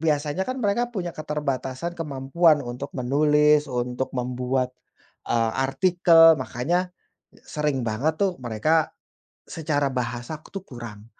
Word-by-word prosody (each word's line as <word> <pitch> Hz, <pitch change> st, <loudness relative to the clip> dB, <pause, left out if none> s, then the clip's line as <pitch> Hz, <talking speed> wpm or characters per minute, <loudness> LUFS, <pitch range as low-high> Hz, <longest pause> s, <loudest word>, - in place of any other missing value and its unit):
biasanya 155 Hz, -, 0 dB
kan 255 Hz, -, -2 dB
mereka 235 Hz, +1 st, 0 dB
punya 185 Hz, -8 st, -4 dB
keterbatasan 150 Hz, 0 st, -3 dB
kemampuan 150 Hz, 0 st, +1 dB
untuk 125 Hz, +3 st, -6 dB
menulis, 150 Hz, +3 st, +3 dB
untuk 125 Hz, +1 st, -2 dB
membuat, 125 Hz, +1 st, -1 dB, 0.6 s
eee, 115 Hz, -1 st, +2 dB
artikel, 165 Hz, +4 st, +5 dB
makanya 145 Hz, +10 st, -1 dB, 0.6 s
sering 150 Hz, -4 st, -2 dB
banget, 120 Hz, +8 st, 0 dB
tuh, 195 Hz, -2 st, +2 dB
mereka 130 Hz, +7 st, +1 dB, 0.6 s
secara 145 Hz, -3 st, -1 dB
bahasa, 125 Hz, +3 st, -4 dB, 0.2 s
tuh, 195 Hz, -, -4 dB
kurang. 115 Hz, -, -10 dB
145 Hz, 115 wpm, -24 LUFS, 125-165 Hz, 0.6 s, artikel